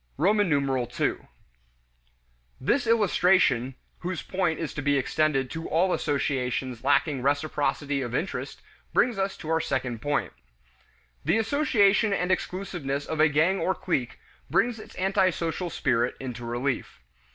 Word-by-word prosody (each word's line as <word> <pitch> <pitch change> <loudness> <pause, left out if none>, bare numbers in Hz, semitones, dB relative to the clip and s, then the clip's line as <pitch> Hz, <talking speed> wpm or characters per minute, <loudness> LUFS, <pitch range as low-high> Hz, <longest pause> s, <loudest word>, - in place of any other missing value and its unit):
II. 145 - +2 1.7
This 240 - +1
illustration 180 - +3 0.2
(whose 180 0 -4
point 180 -4 -1
is 160 - -4
to 145 - -4
be 145 0 +2
extended 135 -1 +1
to 165 0 -5
all 180 +4 +2
associations 130 -4 -1
lacking 140 0 +2
reciprocity 145 0 0
of 120 -1 -3
interest) 180 +7 -4 0.3
brings 240 -5 +2
us 195 0 -1
to 155 - -8
our 160 0 +2
second 130 -5 -2
point. 145 0 -1 0.9
The 165 +9 +2
isolation 220 -4 +3
and 180 -1 0
exclusiveness 175 -8 -2
of 160 - -4
a 155 0 +6
gang 165 +6 +2
or 190 - 0
clique 135 -9 -2 0.3
brings 235 -1 +1
its - - -12
antisocial 185 -2 0
spirit 120 -5 0
into 120 -2 -6
relief. 120 - -3
155 Hz, 130 wpm, -26 LUFS, 135-190 Hz, 1.7 s, a